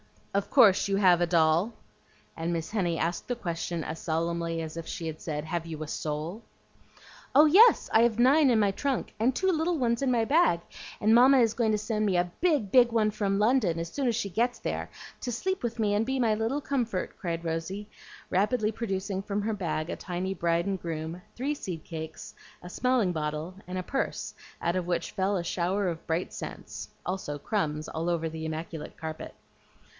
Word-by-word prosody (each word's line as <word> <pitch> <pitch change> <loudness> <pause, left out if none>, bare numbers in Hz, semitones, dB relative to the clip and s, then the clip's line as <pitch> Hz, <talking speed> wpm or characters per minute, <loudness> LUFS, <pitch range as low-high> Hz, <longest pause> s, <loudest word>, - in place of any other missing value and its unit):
Of 200 0 0
course 215 -8 +6
you 195 - +1
have 180 -3 +5
a 175 - +3
doll?" 165 +5 +3 0.6
and 165 +1 -2
Miss 165 -1 -3
Henny 175 -6 0
asked 170 +2 -2
the 245 - -1
question 170 -5 -3
as 160 - -5
solemnly 165 0 -1
as 160 0 -6
if 165 - -6
she 170 - -5
had 160 -1 -5
said, 150 -2 -3
"Have 165 +1 -3
you 155 -1 -5
a - - -7
soul?" 155 +7 -4 0.9
"Oh 295 +3 +9
yes, 410 +10 +7
I 220 - +6
have 235 -2 +2
nine 270 +4 +5
in 240 - +4
my 205 -2 +3
trunk, 270 +4 -2
and 245 +3 +2
two 380 0 +2
little 330 +1 0
ones 235 -3 +1
in 270 - +1
my 235 -3 +2
bag, 275 - +3 0.4
and 215 +2 +4
Mamma 260 +3 +7
is 225 -3 +3
going 230 -3 +1
to - - +2
send 215 0 -1
me 190 -3 +2
a 175 0 0
big, 295 - +1
big 245 -2 +6
one 215 -2 +2
from 200 -2 0
London, 210 -5 +2
as 165 0 -4
soon 275 -3 -1
as 235 - +2
she 210 -3 -2
gets 240 +6 0
there, - - -4 0.3
to 245 - -3
sleep 375 - -2
with 235 -1 -2
me 210 -2 +2
and 210 +2 +2
be 265 +2 -1
my 230 -4 +3
little 225 +7 -1
comfort," 240 -10 -2
cried 170 -1 -3
Rosy, 165 +6 -3 0.4
rapidly 215 +3 +1
producing 195 -3 -3
from 200 +1 -2
her 220 +2 -1
bag 170 -5 -2
a - - -3
tiny 185 +1 -3
bride 170 -1 0
and 195 -2 -2
groom, 165 +1 -4
three 275 +5 -1
seed 180 - -6
cakes, 160 +6 -7 0.3
a 180 - -8
smelling 250 -2 +1
bottle, 155 +1 -3
and 185 0 -4
a 185 - -2
purse 270 +8 -3 0.3
out 170 +2 0
of 180 -1 -2
which 175 -1 -1
fell 195 0 0
a 175 - -1
shower 185 +3 0
of 165 -1 -6
bright 165 +2 -1
cents, - - -7 0.2
also 180 -5 -3
crumbs 155 -3 -2
all 165 +2 -2
over 165 -1 0
the 160 0 -6
immaculate 160 0 -6
carpet. 160 -1 -6
195 Hz, 205 wpm, -28 LUFS, 165-230 Hz, 0.9 s, Oh